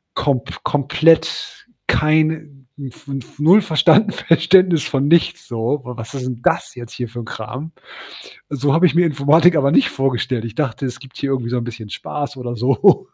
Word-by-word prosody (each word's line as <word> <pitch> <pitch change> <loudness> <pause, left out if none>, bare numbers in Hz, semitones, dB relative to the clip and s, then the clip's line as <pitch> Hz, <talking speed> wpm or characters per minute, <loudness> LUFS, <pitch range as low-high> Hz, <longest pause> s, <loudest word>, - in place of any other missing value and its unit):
kom 135 -5 0 0.2
komplett 165 - +1 0.2
keine 155 +1 +2 0.4
hm, 135 -3 -8
fnf - - -17
fnf 135 0 -8
0 180 +8 +5
verstanden 205 +4 +3
Verständnis 180 -2 +3
von 135 0 -1
nichts 170 +2 +2
so. 120 +4 -2
W 125 - -7
Was 115 +2 -8
ist 130 - -5
denn 125 -2 -6
das 140 - 0
jetzt 120 -1 -10
hier 120 -2 -5
für 120 - -8
'n - - -9
Kram? 125 +8 -7 0.8
So 140 0 -1
habe 165 +3 +4
ich - - -2
mir 175 - +4
Informatik 160 +3 +3
aber 140 -2 +2
nicht 270 - +3
vorgestellt. 125 -3 -2
Ich 110 - -7
dachte, 135 -2 -2
es 125 - -5
gibt 130 -2 -15
hier 140 -1 -3
irgendwie 125 -3 -2
so 125 - 0
'n 120 - -2
bisschen 115 -2 -8
Spaß 145 +4 -6
oder 120 -1 -5
so. 125 +1 +2
140 Hz, 190 wpm, -18 LUFS, 125-160 Hz, 0.8 s, 0